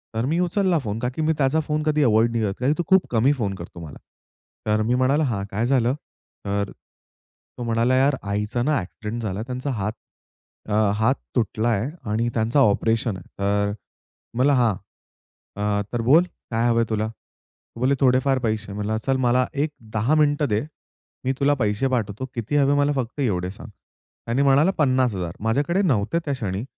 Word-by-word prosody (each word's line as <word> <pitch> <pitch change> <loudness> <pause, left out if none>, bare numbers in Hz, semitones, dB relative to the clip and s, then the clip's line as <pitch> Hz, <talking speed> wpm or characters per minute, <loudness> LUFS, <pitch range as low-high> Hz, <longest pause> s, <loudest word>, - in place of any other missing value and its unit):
तर 115 +2 0
मी 165 +5 0
उचलला 180 0 +2
फोन 105 +1 -3
कारण 125 +1 -2
की 160 - -2
मी 160 +1 +2
त्याचा 140 +3 +2
फोन 150 0 0
कधी 150 -1 +2
अव्हॉइड 115 0 +3
नाही 115 -1 0
करत 100 -2 0
कारण 135 +4 +2
तो 175 - 0
खूप 190 -1 +4
कमी 120 +4 +3
फोन 105 -7 -2
करतो 85 -1 -10
मला. 75 - -10 0.7
तर 105 0 +2
मी 120 +3 +1
म्हणाला 135 +4 +2
"हां, 110 -8 -1
काय 110 +4 0
झालं?" 125 -1 +2 0.5
तर 100 0 -1
तो 120 - -16
म्हणाला 115 +2 +2
"यार 135 +2 +3
आईचा 105 +4 -2
ना, 150 +2 +2
अ‍ॅक्सिडेंट 105 +4 -5
झाला. 100 -1 -3
त्यांचा 125 +3 -4
हात 105 -3 -2 0.8
अ, - - -1 0.2
हात 110 +6 +2 0.2
तुटलाय 115 +1 0 0.2
आणि 115 +2 +1
त्यांचा 115 +5 +1
ऑपरेशन 110 -2 +2
आहे," 90 - -11 0.2
तर 100 +1 +1 0.6
म्हणलं 135 +4 +3
हां, 120 -5 +3 0.8
अ, 105 0 0
"तर 120 - 0
बोल 145 +9 +5 0.3
काय 115 +1 +1
हवंय 115 -1 +3
तुला?" 110 -1 0
तो 115 +1 -17
बोलेले 135 +2 +2
"थोडेफार 130 0 +3
पैसे." 110 -4 -2
म्हणलं 105 +2 -2
चल 135 -1 +2
मला 125 +1 +3
एक 150 +1 0 0.2
10 115 +8 +2
मिनिटं 145 -1 +3
दे. 105 0 +1 0.6
मी 130 - +2
तुला 145 +1 +3
पैसे 105 +3 +1
पाठवतो 110 -1 -2
किती 120 +4 -3
हवे 140 0 +4
मला 145 0 +2
फक्त 125 +1 -3
एवढे 90 -8 0
सांग. 105 +5 -11 0.6
त्याने 120 +4 0
म्हणाला 140 +6 +4
50,000 125 - +1
माझ्याकडे 145 - +1
नव्हते 140 - +1
त्या 145 - -1
क्षणी 105 -5 -3
120 Hz, 180 wpm, -23 LUFS, 105-140 Hz, 0.8 s, बोल